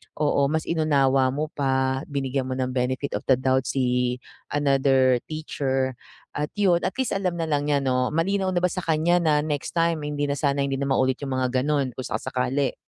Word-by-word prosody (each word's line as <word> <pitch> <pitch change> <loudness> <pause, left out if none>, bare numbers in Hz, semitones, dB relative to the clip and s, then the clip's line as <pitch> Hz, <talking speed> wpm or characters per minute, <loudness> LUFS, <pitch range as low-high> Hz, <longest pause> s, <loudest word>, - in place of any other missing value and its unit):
oo, 145 -2 +2
mas 155 +2 -1
inunawa 140 -5 +3
mo 150 +2 -2
pa 130 -1 0
binigyan 135 -2 -2
mo 130 - -2
ng 130 -1 -1
benefit 130 +2 -1
of - - -10
the 130 - +6
doubt 130 0 +1
si 125 -1 0 0.4
another 135 -3 +3
teacher 135 -4 -2 0.4
at 150 +1 -1
yun 185 -4 +4
at - - -1
least 260 -1 -1
alam 190 -3 -1
na 165 - -1
lang 145 -1 0
niya 145 - +3
'no, 125 -1 +1
malinaw 190 +3 +1
na 175 - +1
ba 180 - +4
sa 185 - -3
kanya 165 +2 +2
na 155 -2 +2
next 145 -2 -3
time 165 -2 +2
hindi 145 0 -2
na - - +1
sana 140 0 +1
hindi 135 -1 -2
na - - 0
maulit 130 -1 +2
'yung 140 - -4
mga 130 0 0
gano'n 145 -1 +1
kung 130 - -4
sakasakali? 130 +1 -1
140 Hz, 200 wpm, -24 LUFS, 130-155 Hz, 0.4 s, the